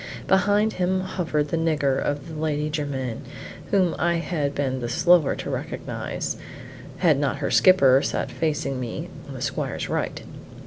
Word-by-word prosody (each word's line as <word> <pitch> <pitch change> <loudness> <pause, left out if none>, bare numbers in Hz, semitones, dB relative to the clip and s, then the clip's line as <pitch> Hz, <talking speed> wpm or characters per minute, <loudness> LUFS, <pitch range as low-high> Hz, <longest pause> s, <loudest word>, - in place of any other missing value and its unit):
Behind 205 +3 +3
him 185 +1 0
hovered 165 -5 -1
the 165 - 0
nigger 150 -5 +1
of 145 0 -2
the 160 - -8
Lady 150 -1 -1
Jermyn, 135 -6 -3 0.5
whom 185 -4 +3
I 170 +1 +2
had 160 -4 -2
been 130 -2 -1
the 120 -1 -3
slower 170 +3 +4
to - - -5
recognize, - - -4 0.6
had 160 -6 +3
not 140 -3 0
her 140 - -2
skipper 140 -8 +6
sat - - -2
facing 150 -4 -1
me 120 -3 -5 0.2
on - - -8
the - - -5
squire's - - -3
right. - - -2
150 Hz, 155 wpm, -24 LUFS, 140-175 Hz, 0.6 s, skipper